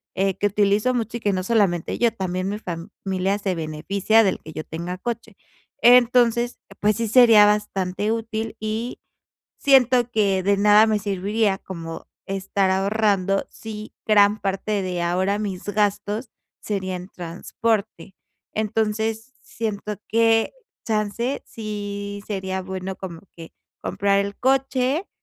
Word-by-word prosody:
eh, 195 0 +1
que 205 - +2
utilizo 205 +4 +2
mucho, 235 -1 -2
y - - -9
que 205 -3 0
no 185 0 -1
solamente 190 -5 +1
yo, 235 -1 +3
también 185 -2 -2
mi 205 +1 -3
familia 190 +1 -3
se 195 -3 -1
beneficia 180 +8 +1
del 195 - 0
que 160 - -11
yo 155 - -5
tenga 170 +3 -5
coche. 225 0 -5 0.5
Entonces, 240 0 +5 0.2
pues, 210 0 +2
sí 230 0 -1
sería 225 -2 +7
bastante 205 -1 0
útil, 225 0 -3
y 220 +3 -3 0.6
siento 255 -3 +4
que 200 -4 +1
de 200 +2 +2
nada 210 +1 +6
me 215 -1 +2
serviría 200 +1 0
como 165 -4 -8 0.2
estar 195 0 0
ahorrando 195 0 +1
si 215 -1 -8
gran 210 0 +5
parte 200 +1 -1
de 180 -2 -2
ahora 185 +4 +1
mis 200 -4 -4
gastos 205 +2 -1 0.3
serían 185 -3 -4
transporte. 200 +4 -3 0.4
Entonces, 220 +2 -1
siento 210 -2 -4
que 225 0 +3 0.3
chance 220 +4 -1
sí 205 -2 -5
sería 190 -2 -3
bueno 190 0 -5
como 170 -4 -8 0.2
que 165 -1 -11 0.3
comprar 200 +1 +1
el 200 0 -3
coche 270 +4 +1
205 Hz, 135 wpm, -23 LUFS, 190-225 Hz, 0.6 s, sería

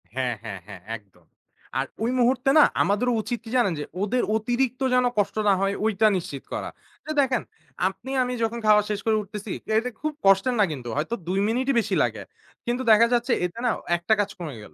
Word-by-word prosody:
হ্যাঁ, 130 -2 0
হ্যাঁ, 105 -4 -6
হ্যাঁ। 100 -4 -10 0.2
একদম 95 -5 -27 0.5
আর 135 - 0 0.2
ওই 235 - +1
মুহূর্তে 255 +2 +2
না - - +9 0.2
আমাদেরও 210 +6 +2
উচিত 240 +2 -3
কি - - -8
জানেন 230 -8 +2
যে, - - -2 0.2
ওদের 225 +5 +1
অতিরিক্ত 245 +3 0
যেন 250 0 +4
কষ্ট 205 - +1
না 200 - +6
হয় 195 0 +1
ওইটা 220 0 +3
নিশ্চিত 155 -6 -6
করা। - - -3 0.4
তো - - -11
দেখেন, 260 -4 +1 0.5
আপনি 235 +7 -6
আমি 250 0 -3
যখন 230 +1 -1
খাওয়া 210 -1 +6
শেষ 210 -1 -1
করে 220 -1 +3
উঠতেছি 205 0 -7 0.3
এটা 240 +3 0
খুব 310 0 -2
কষ্টের 195 +6 +4
না 205 - +6
কিন্তু 130 -5 -6
হয়তো 160 +10 -1
২ 190 +2 0
মিনিটই 255 +5 +1
বেশি 210 -3 -1
লাগে। 110 -4 -2 0.4
কিন্তু 240 +2 -1
দেখা 225 +2 +7
যাচ্ছে 240 +1 +1
এতে 180 +5 -6
না - - +3 0.3
১ 170 - -4
টা - - +7
কাজ 205 - +1
কমে 155 -6 -6
গেল। 80 - -14
215 Hz, 210 wpm, -25 LUFS, 180-245 Hz, 0.5 s, না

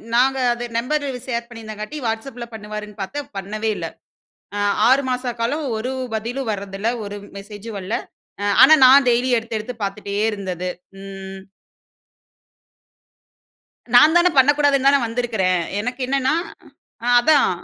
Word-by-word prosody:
நாங்க 265 +2 +3 0.2
அது 240 0 -5
number 285 +5 -1 0.2
share 235 -2 -3
பண்ணியிருந்தங்காட்டி, 220 +3 -7
WhatsAppல 235 +2 -4
பண்ணுவாருன்னு 210 -1 -8
பாத்தேன். 285 +9 -5
பண்ணவே 215 +3 -3
இல்ல. - - -4 0.7
அ - - -2 0.3
6 265 +2 +5
மாச 250 0 -2
காலம் 285 +6 -1
ஒரு 250 +4 -3 0.2
பதிலும் 235 +3 -3
வரதில்ல. 200 +1 -4 0.2
ஒரு 205 0 -6 0.2
மெசேஜும் 205 +2 -9
வரல. 195 +4 -4 0.7
ஆனா, 310 - +9
நான் 265 +1 +7
டெய்லி 245 +1 +2
எடுத்து 225 0 -3
எடுத்து 220 +4 -6
பாத்துட்டே 200 0 -5 0.2
இருந்தது. 185 -4 -4 0.3
ம். 195 0 -8 2.5
நான் 300 +6 +7
தானே 350 +1 +5
பண்ணக்கூடாதுன்னு 280 0 +4
தானே 280 0 +4
வந்திருக்கிறேன். 225 -6 0 0.2
எனக்கு 250 +4 -4
என்னன்னா, 270 +1 +1 0.7
அ - - -2
அதான். 285 +3 +4
230 Hz, 125 wpm, -21 LUFS, 205-265 Hz, 2.5 s, ஆனா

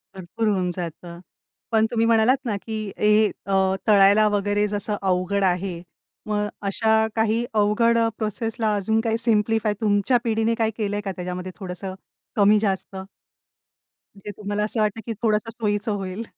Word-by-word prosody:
भरपूर 190 +5 -3
होऊन 185 -3 +1
जातं. 170 0 -7 0.5
पण 220 0 +3
तुम्ही 230 -1 +1
म्हणालात 230 +3 +4
ना, 220 -4 -1
की 215 +1 -5
हे 210 +1 +4 0.2
अ, 190 -1 +2
तळायला 205 +1 +6
वगैरे 205 0 +1
जसं 205 0 -2
अवघड 190 +1 0
आहे, 180 -1 -1 0.5
मग 210 -1 0 0.2
अशा 220 +2 +2
काही 225 +1 +1
अवघड 220 +2 +3 0.2
प्रोसेसला 220 0 -2
अजून 220 +2 0
काही 225 -1 0
सिम्प्लिफाय 220 -2 +2
तुमच्या 205 +3 +2
पिढीने 225 0 +1
काही 225 -1 0
केलंय 205 -2 -2
का 195 - -2
त्याच्यामध्ये 180 0 -5
थोडंसं 185 0 -6 0.4
कमी-जास्त? 205 -2 +2 1.2
म्हणजे 200 +1 -8
तुम्हाला 205 0 -2
असं 215 +2 -2
वाटतं, 215 +1 0
की 230 - -3
थोडंसं 215 0 +1
सोयीचं 210 -1 -1
होईल? 195 +1 -4
210 Hz, 145 wpm, -23 LUFS, 195-220 Hz, 1.2 s, तळायला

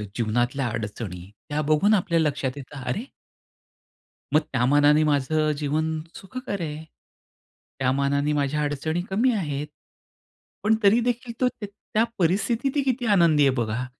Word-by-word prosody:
जीवनातल्या 120 +4 0
अडचणी, 105 -5 -5 0.2
त्या 150 +1 0
बघून 155 +8 +3
आपल्या 175 -4 +2
लक्षात 145 -4 -1
येतं 140 0 -9
अरे 125 - -2 1.3
मग 155 - +6
त्या 125 -2 +2
मानाने 145 +3 +5
माझं 155 +1 +1
जीवन 155 +2 -1 0.2
सुखकर 205 -1 -6
आहे? 155 -1 -5 1.0
त्या 130 -1 +2
मानाने 140 +2 +1
माझ्या 145 +1 0
अडचणी 150 +4 -1
कमी 225 +7 +2
आहेत. 150 -8 -2 1.0
पण 220 +1 +4
तरी 205 +4 +6
देखील 245 0 -2
तो 255 - +5
त - - -2
त्या 210 +2 -2 0.2
परिस्थितीत 220 +9 +1
ही - - +4
किती 255 -2 -1
आनंदी 165 -5 +4
आहे - - +4
बघा. 120 0 -1
150 Hz, 140 wpm, -24 LUFS, 140-195 Hz, 1.3 s, मग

